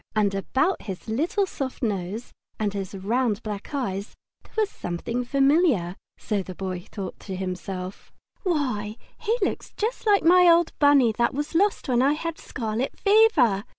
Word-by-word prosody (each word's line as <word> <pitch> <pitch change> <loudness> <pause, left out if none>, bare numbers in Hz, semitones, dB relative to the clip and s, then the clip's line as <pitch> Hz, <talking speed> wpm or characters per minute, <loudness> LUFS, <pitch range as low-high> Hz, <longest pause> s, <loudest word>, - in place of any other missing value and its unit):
And 205 -2 +2
about 260 - 0
his 190 -1 -7
little 320 - +1
soft 270 -8 -5
nose 205 +1 -3 0.3
and 210 -2 0
his 195 -1 -5
round 220 +3 0
black 210 -2 -6
eyes 205 -8 -3 0.3
there - - -23
was 430 -1 +3
something 230 +8 -3
familiar, 270 - +2 0.2
so 210 - -2
that 195 - -3
the 185 - -7
Boy 185 -1 -5
thought 195 -3 -6
to 190 - -6
himself: 185 0 -5 0.3
"Why, 250 - -1 0.2
he 455 +1 0
looks - - -2
just 445 +1 -2
like 405 -1 +5
my 360 +1 +6
old 335 0 +4
Bunny 285 -5 +5
that 235 - +2
was 295 +3 -3
lost 395 +5 +2
when 245 -2 +3
I 275 +3 +4
had 330 +1 -4
scarlet 230 +1 -3
fever!" 400 - +4
240 Hz, 165 wpm, -25 LUFS, 195-315 Hz, 0.3 s, my